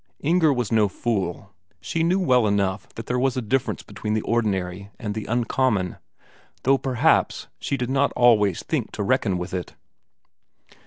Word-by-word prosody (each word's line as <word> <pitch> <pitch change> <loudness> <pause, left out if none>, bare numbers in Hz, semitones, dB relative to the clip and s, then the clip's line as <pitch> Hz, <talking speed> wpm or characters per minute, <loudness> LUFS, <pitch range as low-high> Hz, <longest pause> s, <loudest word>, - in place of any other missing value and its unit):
Inger 160 0 +3
was 125 -5 -1
no 110 -2 +4
fool; 95 -2 -3 0.3
she 165 - -2
knew 175 +4 +2
well 125 - +3
enough 100 -1 0
that 115 - -6
there 125 0 -1
was 130 0 +1
a - - +2
difference 130 +4 -1
between 105 0 -4
the 110 - -1
ordinary 100 -4 -1
and 105 -4 -4
the 110 0 -5
uncommon, 120 -5 0 0.7
though 135 +1 +4
perhaps 130 -3 +1
she 140 - -2
did 125 0 -2
not 140 +1 +2
always 105 -7 +3
think - - -2
to - - -2
reckon 95 - +1
with 90 +1 -5
it. 90 -2 -4
115 Hz, 165 wpm, -24 LUFS, 100-130 Hz, 0.7 s, no